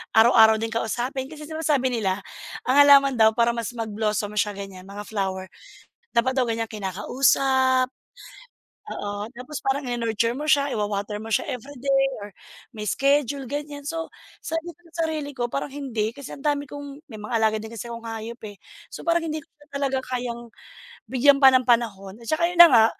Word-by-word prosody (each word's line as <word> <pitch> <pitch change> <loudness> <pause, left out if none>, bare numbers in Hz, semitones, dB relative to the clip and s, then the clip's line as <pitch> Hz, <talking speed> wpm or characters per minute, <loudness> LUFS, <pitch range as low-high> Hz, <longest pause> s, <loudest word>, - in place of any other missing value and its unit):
araw-araw 220 -1 +7
din 225 - -1
kausapin. 245 +4 -2
Kasi 300 +1 -10
sinasabi 300 -5 +1
nila 200 -5 -1 0.4
ang 255 - +2
halaman 280 -2 +7
daw 220 -1 +6
para 235 +1 +3
mas 235 0 -3
mag-blossom 210 -2 -2
siya, 210 0 +1
ganyan, 195 -2 -9
mga 200 +1 -8
flower 190 -3 -3 0.7
dapat 235 +2 +3
daw 255 - +3
ganyang 225 -1 -2
kinakausap, 255 +6 +2 1.0
oo, 205 +1 -5
tapos 255 +4 -8
parang 270 +1 -1
i-nurture 230 0 0
mo 300 +4 -3
siya, 280 -2 +3
iwa-water 210 0 -2
mo 220 - -7
siya 225 - +1
everyday, 270 +2 0
or 205 -1 -9 0.4
may 215 - -8
schedule, 280 +1 +1
ganyan. 290 +2 -5
So, 325 +2 -4 0.3
sabi 325 +1 -4
ko 345 - -32
sarili 320 -3 -2
ko, 240 - 0
parang 275 - -2
hindi. 260 -6 -2
Kasi 280 - -8
ang - - -10
dami 290 0 0
kong 285 +2 -9
may 215 - -8
mga 210 - -7
alaga 220 -1 +2
din 220 - -8
kasi 230 0 -7
akong 230 0 -7
hayop, 225 +2 -6
eh. 205 - -13 0.3
So, - - -9
parang 340 0 +3
hindi 310 - -2
ko - - -56 0.2
talaga 275 -1 -1
kayang 245 -2 -5 0.6
bigyan 270 +4 +4
pa 270 - +8
ng 255 - +4
panahon, 220 -5 0
at 230 - -13
tsaka 310 +5 0
yun 355 - -6
na 345 - +13
nga, 230 -7 +6
245 Hz, 175 wpm, -24 LUFS, 220-280 Hz, 1.0 s, na